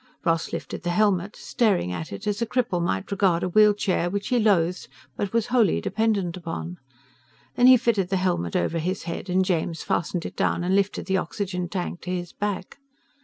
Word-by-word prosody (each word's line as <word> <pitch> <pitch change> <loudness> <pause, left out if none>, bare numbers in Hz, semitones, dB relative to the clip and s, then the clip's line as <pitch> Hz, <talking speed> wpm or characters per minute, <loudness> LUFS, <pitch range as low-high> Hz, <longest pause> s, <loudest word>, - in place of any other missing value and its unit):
Ross 165 -2 +1
lifted - - -5
the 175 - -3
helmet, 200 +1 +1
staring 205 - 0
at 85 -3 -5
it 100 - -7
as 210 0 -1
a - - +2
cripple 235 -8 0
might 95 - -2
regard 185 -4 +2
a 180 - 0
wheelchair 205 -3 +3
which 200 +2 -3
he 250 - +2
loathed 180 -5 +2 0.3
but 200 -2 -3
was 230 -2 +1
wholly 220 - +4
dependent 200 - 0
upon. 85 - -6 0.7
Then 245 - +5
he 255 0 +9
fitted 220 -6 +1
the 195 - +1
helmet 175 - -1
over 165 - 0
his 185 +4 -2
head 170 +2 -5
and 185 +1 +2
James 165 -2 -1
fastened 170 +1 -1
it - - -6
down 175 - 0
and 185 +2 +1
lifted 200 +1 0
the 190 0 +1
oxygen 180 0 -3
tank 180 -2 -4
to 180 - -7
his 175 -1 -4
back. 205 +4 -4
185 Hz, 195 wpm, -25 LUFS, 170-205 Hz, 0.7 s, he